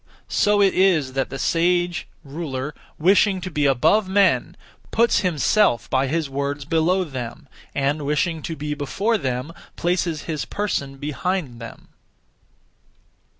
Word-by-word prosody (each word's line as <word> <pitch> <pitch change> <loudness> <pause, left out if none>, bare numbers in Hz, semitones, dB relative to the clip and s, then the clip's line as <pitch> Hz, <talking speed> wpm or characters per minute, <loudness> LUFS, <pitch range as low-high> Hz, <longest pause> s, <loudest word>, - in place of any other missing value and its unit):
So 205 0 +4
it 195 - +3
is 170 -9 +3
that 135 0 -1
the 135 - -5
sage 175 +3 +1 0.2
(ruler), 140 -2 -5 0.2
wishing 190 +3 +4
to 185 0 -5
be 150 -2 +1
above 185 - +3
men, 200 0 +2 0.3
puts 235 +1 +3
himself 175 - +2
by 135 +1 +2
his 160 +2 -1
words 140 +1 -3
below 165 +5 +2
them, 130 -2 -7 0.3
and, 140 +2 0
wishing 155 +3 0
to 160 - -5
be 150 0 -3
before 195 - -1
them, 130 +3 -3 0.2
places 170 -3 -1
his 155 -3 -3
person 140 -10 -3
behind 150 -2 -3
them. 115 - -10
155 Hz, 135 wpm, -22 LUFS, 140-185 Hz, 0.3 s, So